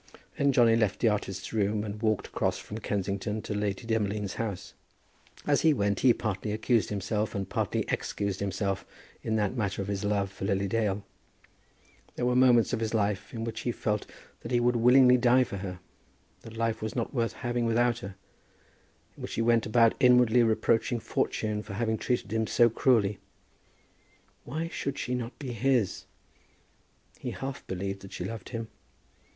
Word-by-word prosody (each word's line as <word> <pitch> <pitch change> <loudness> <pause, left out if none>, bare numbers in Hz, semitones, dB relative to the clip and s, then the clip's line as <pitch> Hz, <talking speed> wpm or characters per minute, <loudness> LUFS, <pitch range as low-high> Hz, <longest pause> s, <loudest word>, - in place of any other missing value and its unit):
Then 140 0 +2
Johnny 120 -3 +5
left 105 -4 +1
the 115 - +4
artist's 95 -2 -3
room 105 -1 +1
and 105 0 -6
walked 110 -3 +1
across - - -1
from 110 - -7
Kensington 100 +1 -2
to - - -4
Lady 105 +1 -2
Demolines' 105 -3 -1
house. 105 -5 -4 0.7
As 145 -1 +3
he 160 -2 +4
went 100 -3 0
he 130 - +6
partly 105 -2 -2
accused 110 +1 +1
himself, 105 +2 -2
and 100 -2 -2
partly - - -1
excused 100 -2 -2
himself 100 0 -2 0.4
in 110 - -1
that 105 +2 0
matter 100 -5 -2
of 100 0 -3
his 100 0 -2
love 100 -1 0
for 95 - -6
Lily 100 0 0
Dale. 105 -1 0 1.1
There 120 - -1
were 125 0 +2
moments 125 -2 +5
of 120 - 0
his 115 0 -1
life 100 -2 -1
in 115 -1 -5
which 115 -1 -4
he 120 - -1
felt 105 -2 -2 0.3
that 115 - -8
he 120 - +3
would 120 +1 +2
willingly 125 +2 +6
die 125 +1 +4
for 100 - -6
her, 90 -1 -6 0.6
that 115 0 -11
life 115 -1 -1
was 110 0 -4
not 120 +1 -2
worth 115 -3 0
having 120 -1 -2
without 120 +1 +2
her, 95 -4 -8 1.0
in - - -13
which - - -5
he 115 - 0
went 115 -1 +3
about 115 +1 +4
inwardly 125 -2 +5
reproaching 115 +1 +2
fortune 105 +1 -1
for 105 -1 -8
having 110 0 -1
treated 120 -4 -1
him 110 -1 0
so 120 +1 +4
cruelly. 105 -5 +2 1.3
Why 160 +6 -3
should 140 -4 -4
she 125 - -3
not 125 -1 -4
be 135 -4 -6
his? 120 -2 0 1.1
He - - -4
half 135 0 -6
believed 95 +1 -3
that 95 - -11
she 90 - -4
loved 110 0 -6
him. 115 -2 -5
110 Hz, 180 wpm, -28 LUFS, 100-120 Hz, 1.3 s, he